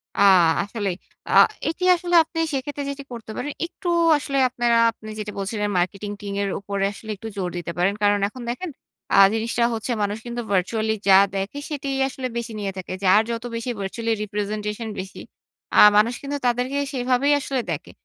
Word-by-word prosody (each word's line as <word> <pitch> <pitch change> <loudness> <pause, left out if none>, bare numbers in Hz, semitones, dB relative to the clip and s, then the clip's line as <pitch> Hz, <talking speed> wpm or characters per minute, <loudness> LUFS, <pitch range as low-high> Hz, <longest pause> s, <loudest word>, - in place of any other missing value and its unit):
আ - - -4 0.4
আসলেই। 205 -3 -3 0.3
আ - - 0 0.4
এটি 330 +3 -4
আসলে 350 0 -1
আপনি 325 +1 -6
সেক্ষেত্রে 285 +2 -3
যেটি 280 0 -6
করতে 225 -2 -8
পারেন, 290 - -3
একটু 350 +1 -9 0.3
আসলে 275 -1 -3
আপনারা 240 -1 +1
আপনি 215 -1 -12
যেটি 210 0 -4
বলছিলেন 205 +1 -2
মার্কেটিং 200 +3 -2
টিমের 200 -1 -2
উপরে 200 0 -3
আসলে 220 - -12
একটু 215 +3 -9
জোর 180 -2 -1
দিতে 175 -1 -4
পারেন। 180 +3 +2
কারণ 205 0 +4
এখন 250 +5 -10
দেখেন 345 +9 -4 0.5
আ - - +4 0.2
জিনিসটা 230 +1 0
হচ্ছে 225 +2 -3
মানুষ 205 +1 -1
কিন্তু 240 0 -4
virtually 215 +4 +1
যা 190 -1 +8 0.2
দেখে 195 +8 -3
সেটিই 280 -2 -3
আসলে 265 -1 -4
বেশি 235 -1 -4
নিয়ে 200 -1 -2
থাকে। 185 0 -6
যার 195 +3 +6
যত 230 0 -4
বেশি 230 +2 -4
virtually 225 +4 -2
representation 210 +2 -3
বেশি, 190 +1 -7 0.6
আ - - +8 0.2
মানুষ 220 +3 +4
কিন্তু 285 +1 -3
তাদেরকে 250 +3 0 0.2
সেভাবেই 255 +3 +2
আসলে 270 -2 -2
দেখে। - - -5
225 Hz, 175 wpm, -23 LUFS, 200-260 Hz, 0.6 s, যা